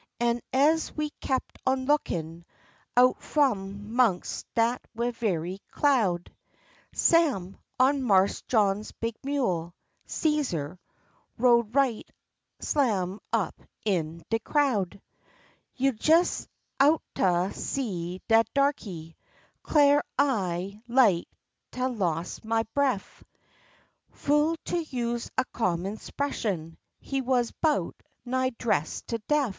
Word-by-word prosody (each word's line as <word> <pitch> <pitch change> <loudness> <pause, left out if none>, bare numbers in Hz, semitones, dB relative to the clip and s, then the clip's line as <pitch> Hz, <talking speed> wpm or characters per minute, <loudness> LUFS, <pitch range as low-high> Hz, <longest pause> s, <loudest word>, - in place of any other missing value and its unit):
An' 235 0 +1
ez 305 +5 +3
we 300 -1 -1
kep' 260 -1 0 0.2
on 260 0 +1
a - - -6
lookin', 170 - -1 0.5
out 250 +1 +5
f'om 205 -8 0
'mongst 230 -7 +1
dat 235 +2 +2
ve'y 215 -7 -2
cloud, 215 -12 +1 0.6
Sam, 270 - +2 0.2
on 270 +2 +4
Marse 195 -5 +3
John's 210 -2 +1
big 230 0 -3
mule, 185 - -1 0.3
Cæsar, 185 - -1 0.6
rode 235 -1 +3
right 265 -6 +1 0.5
slam 205 -9 0
up - - -1 0.2
in 165 -5 -1
de 225 - +2
crowd. 220 - 0 0.8
You 270 +1 +2
jes 330 +3 +3 0.3
oughtah 195 - +2
seed 185 -8 -4
dat 225 -1 +4
darkey, 200 - -1 0.5
'clar 290 -1 +4
I 200 -7 0
like 235 -8 +4 0.4
tah 255 0 -2
loss 175 -8 -2
ma 225 0 +1
bref; 270 -8 -1 0.9
Fu' 295 +3 +1
to 350 - 0
use 240 -6 -3
a 260 - +2
common 190 -1 -1
'spression, 195 - -3 0.2
he 275 -1 -2
wuz 250 -2 +1
'bout 310 -3 0 0.2
nigh 255 +1 +1
dressed 155 -10 -1
to 230 - -1
def. 295 -4 +2
235 Hz, 105 wpm, -27 LUFS, 190-275 Hz, 0.9 s, out